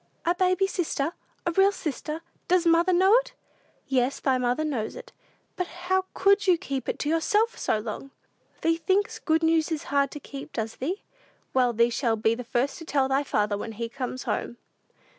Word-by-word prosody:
"A 345 - +3
baby 370 +1 +2
sister? 335 -5 -1 0.3
A 340 - +1
real 390 +3 +5
sister? 310 -2 -4 0.3
Does 360 -1 +3
mother 335 +2 +4
know 375 +3 +5
it?" - - -2 0.5
"Yes, 260 0 +1
thy 260 -2 +1
mother 250 +4 +1
knows 245 -8 -2
it." - - -10 0.4
"But 360 -2 -2
how 370 +2 -1
could 400 0 +3
you 360 -2 +5
keep 275 -4 -4
it - - -2
to 295 - -2
yourself 415 +8 +2
so - - 0
long?" 215 +5 -6 0.5
"Thee 330 0 +2
thinks 385 +4 0
good 320 0 +1
news 325 0 +3
is 310 -2 -2
hard 280 0 +3
to 295 - -8
keep, 280 +1 -9
does 225 -1 -3
thee? 350 +10 -3 0.5
Well, 250 -2 +3
thee 235 +1 +3
shall 230 -1 +1
be 220 +1 +2
the 250 +2 -5
first 245 +6 -1
to - - -8
tell 275 -3 +1
thy 270 +1 +2
father 210 -7 0
when 225 +1 -5
he 230 +2 -4
comes 255 0 -5
home." 240 - -3
305 Hz, 195 wpm, -26 LUFS, 250-360 Hz, 0.5 s, real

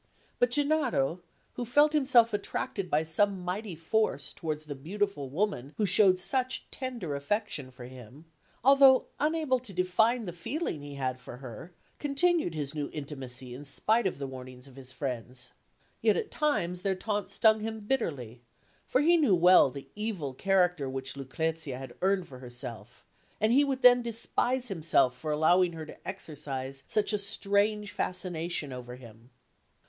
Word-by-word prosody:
But 245 - +4
Gennaro, 275 - +1 0.3
who 245 - -4
felt 290 +6 +4
himself 255 -6 +4
attracted 200 -2 -3
by 155 +1 +2
some 190 +4 +1
mighty 190 +1 -3
force 165 -3 -1
towards 155 -1 -4
the 150 - -5
beautiful 165 0 -3
woman 150 -4 -2
who 215 - +2
showed 190 -1 +5
such 260 +5 -1
tender 240 - -4
affection 145 -1 -2
for 125 -1 -11
him, 130 +4 -12 0.4
although 270 0 +7
unable 300 -3 +1
to 245 -4 -9
define 220 +7 +2
the 175 - -5
feeling 175 - -4
he 145 0 -8
had 130 -2 -2
for 125 -1 -10
her, 130 +6 -9 0.3
continued 295 - +1
his 145 -2 -4
new 150 -2 -3
intimacy 130 -4 -6
in 135 +4 -8
spite 215 +9 +1
of 180 - -3
the 140 - -4
warnings 130 0 -10
of 135 - -16
his 130 -1 -10
friends; 125 -2 -5 0.5
yet - - +3
at 455 -2 -3
times 180 - 0
their 195 0 0
taunts 205 +1 -3
stung 220 -2 +5
him 220 +1 -4
bitterly, 145 - -2 0.5
for 255 - +2
he 340 +3 +5
knew 285 - +4
well 180 -4 +6
the 140 +1 -10
evil 205 -11 -3
character 180 -3 +1
which 135 0 -4
Lucrezia 140 +1 -3
had 135 0 -8
earned 190 -1 +1
for 130 -2 -11
herself, 120 -2 -8 0.3
and 215 +2 +3
he 280 +3 +6
would 270 -2 -2
then 245 0 +8
despise 240 +2 0
himself 155 - +2
for 155 +4 -6
allowing 170 +4 +3
her 160 -1 -6
to - - -13
exercise 140 -7 -6
such 215 0 +2
a 210 - +1
strange 205 +1 +1
fascination 170 -5 -2
over 125 -1 -8
him. 115 -1 -15
180 Hz, 165 wpm, -29 LUFS, 135-220 Hz, 0.5 s, then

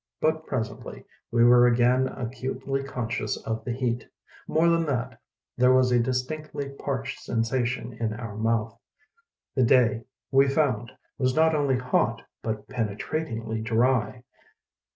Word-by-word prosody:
But 155 0 0
presently 110 -5 -5 0.2
we 115 0 +3
were 120 0 +7
again 125 +2 +3
acutely 130 +2 -4
conscious 125 -2 -3
of 110 0 -3
the 120 - -3
heat. 120 -1 -1 0.4
More 160 +2 +3
than 170 0 +3
that, 125 -5 -3 0.4
there 125 +1 +5
was 130 -1 +4
a 120 - +4
distinctly 140 +4 -2
parched 140 0 -4
sensa 115 +2 0
tion 120 -1 -4
in 115 -1 -2
our 115 -3 -7
mouth. 115 +1 -1 0.7
The 130 - +1
day, 115 -2 +3 0.3
we 135 +1 +5
found, 135 -5 0 0.3
was 130 -1 +1
not 160 0 +4
only 140 -4 +2
hot 125 0 0 0.2
but 110 -2 -4
penetratingly 115 0 -3
dry. 115 +1 +1
125 Hz, 135 wpm, -26 LUFS, 115-135 Hz, 0.7 s, were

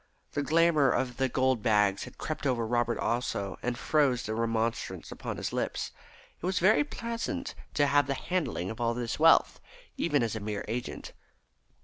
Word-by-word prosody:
The 145 - -1
glamour 155 -1 +4
of 125 -2 0
the 130 -1 +1
gold 130 -2 +1
bags 105 -3 +2
had - - -13
crept 155 -2 -3
over 120 -3 +1
Robert 120 +1 +1
also, 100 -5 -2
and 125 0 -2
froze 140 -3 +2
the 110 - -3
remonstrance 115 0 -2
upon - - -5
his - - -4
lips. - - -2 0.5
It - - -4
was 185 0 0
very 210 +10 +5
pleasant 260 +1 -4 0.2
to 145 - +4
have 145 -1 +3
the 135 - 0
handling 150 - -2
of 115 +2 -7
all 115 0 +1
this 120 -1 -3
wealth, - - +5 0.4
even - - +2
as 115 -1 -1
a - - -3
mere 105 0 -4
agent. 120 +3 -5
125 Hz, 175 wpm, -29 LUFS, 115-150 Hz, 0.5 s, very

